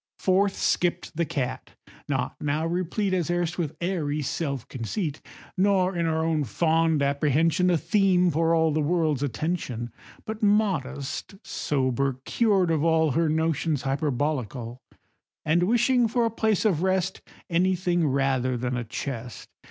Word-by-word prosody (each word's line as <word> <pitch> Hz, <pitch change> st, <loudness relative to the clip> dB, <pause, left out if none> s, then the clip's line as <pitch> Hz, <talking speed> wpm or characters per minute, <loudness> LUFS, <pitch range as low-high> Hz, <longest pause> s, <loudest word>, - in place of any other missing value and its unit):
Forth 195 Hz, +1 st, +2 dB
skipp'd 175 Hz, -1 st, 0 dB
the 170 Hz, 0 st, 0 dB
cat, 135 Hz, -6 st, -4 dB, 0.3 s
not -, -, -2 dB
now 150 Hz, +2 st, 0 dB
replete 185 Hz, +4 st, -1 dB
As 175 Hz, -3 st, 0 dB
erst 175 Hz, 0 st, -1 dB
with 155 Hz, -4 st, -3 dB
airy 155 Hz, -5 st, -1 dB
self 140 Hz, -3 st, -3 dB
conceit, 145 Hz, -, -4 dB, 0.3 s
Nor 190 Hz, -1 st, +2 dB
in 170 Hz, -1 st, 0 dB
her 160 Hz, 0 st, 0 dB
own 160 Hz, -2 st, +1 dB
fond 160 Hz, -, +1 dB
apprehension 150 Hz, +5 st, +2 dB
A 175 Hz, -, +3 dB
theme 180 Hz, +1 st, +3 dB
for 165 Hz, +2 st, +2 dB
all 160 Hz, -1 st, +3 dB
the 155 Hz, +1 st, 0 dB
world's 155 Hz, -3 st, +1 dB
attention, 140 Hz, -5 st, -3 dB, 0.3 s
But 220 Hz, 0 st, -5 dB
modest, 190 Hz, -8 st, 0 dB
sober, 135 Hz, -1 st, -1 dB
cured 195 Hz, -7 st, +2 dB
of 155 Hz, -2 st, +1 dB
all 160 Hz, -2 st, +3 dB
Her 160 Hz, +4 st, +1 dB
notions 160 Hz, -2 st, 0 dB
hyperbolical, 135 Hz, -4 st, -2 dB, 0.6 s
And 160 Hz, +3 st, +3 dB
wishing 240 Hz, +5 st, +3 dB
for 235 Hz, +1 st, +1 dB
a 230 Hz, -, 0 dB
place 220 Hz, -2 st, 0 dB
of 180 Hz, -7 st, +2 dB
rest 190 Hz, 0 st, 0 dB, 0.3 s
Any 185 Hz, +2 st, +2 dB
thing 175 Hz, -2 st, +1 dB
rather 130 Hz, -2 st, +1 dB
than 125 Hz, +1 st, -2 dB
a 125 Hz, -, -2 dB
chest. 120 Hz, 0 st, -6 dB
160 Hz, 145 wpm, -26 LUFS, 140-180 Hz, 0.6 s, A